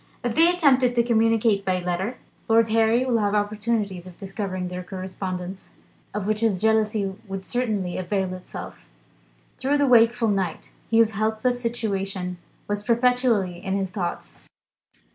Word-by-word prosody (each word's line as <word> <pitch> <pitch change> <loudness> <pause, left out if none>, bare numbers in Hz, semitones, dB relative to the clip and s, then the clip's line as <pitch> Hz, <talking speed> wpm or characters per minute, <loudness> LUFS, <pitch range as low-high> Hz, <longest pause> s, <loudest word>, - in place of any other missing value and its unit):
If 240 -2 -1
they 330 +5 +5
attempted 270 -8 +3
to 235 - +4
communicate 225 -3 +2
by 185 -1 0
letter, 180 +6 -2 0.3
Lord 225 0 +4
Harry 225 +3 +3
would 240 -3 +2
have 205 0 +1
opportunities 205 -3 -1
of 180 - -12
discovering 190 -2 -4
their 180 0 -5
correspondence, 185 0 -6 0.4
of 205 -1 -3
which 215 0 0
his 220 -5 +1
jealousy 215 -2 +1
would 195 -1 -5
certainly 215 -8 -1
avail 185 0 -1
itself. 185 0 -9 0.7
Through 280 +2 +1
the 285 - +3
wakeful 235 -2 +4
night, 190 -4 -2 0.2
Hugh's 225 -1 +4
helpless 220 +4 0
situation 195 -6 -3 0.3
was 205 0 -2
perpetually 235 -6 +2
in 195 -1 -1
his 190 -2 -2
thoughts. 185 -4 -5
210 Hz, 145 wpm, -24 LUFS, 190-230 Hz, 0.7 s, they